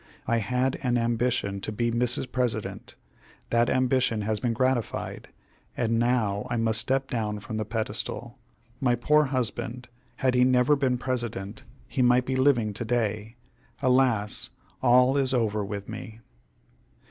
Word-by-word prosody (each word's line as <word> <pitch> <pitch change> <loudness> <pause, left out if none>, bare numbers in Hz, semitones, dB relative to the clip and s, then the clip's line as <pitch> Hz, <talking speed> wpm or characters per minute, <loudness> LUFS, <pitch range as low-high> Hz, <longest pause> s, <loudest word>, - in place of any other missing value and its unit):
I 115 - +1
had 125 +4 -1
an 125 -3 +1
ambition 115 -4 0
to 110 - -4
be 115 +2 -1
Mrs. 125 +1 +1
President; 120 -4 -3 0.6
that 120 0 +3
ambition 130 -3 +1
has 105 0 -1
been 120 +2 0
gratified, 130 -1 -1 0.5
and 115 -1 +1
now 120 -3 +1
I 120 - -1
must 110 -1 +3
step 135 +1 0
down 105 -4 -2
from 110 +2 -6
the 110 - -2
pedestal. 110 +1 -4 0.4
My 125 -2 +2
poor 150 +6 +3
husband! 125 -1 -3 0.3
had 130 -1 +1
he 125 0 +4
never 125 +3 +4
been 130 -3 +1
President, 120 -5 -4 0.3
he 135 - -2
might 125 0 +4
be 130 - -1
living 130 -6 +2
to 115 - -4
day. 110 -1 -2 0.4
Alas! 125 -6 +2 0.3
all 125 +2 +5
is 135 -1 +1
over 110 -3 0
with 100 0 -5
me!" 110 0 -8
120 Hz, 145 wpm, -26 LUFS, 110-130 Hz, 0.6 s, all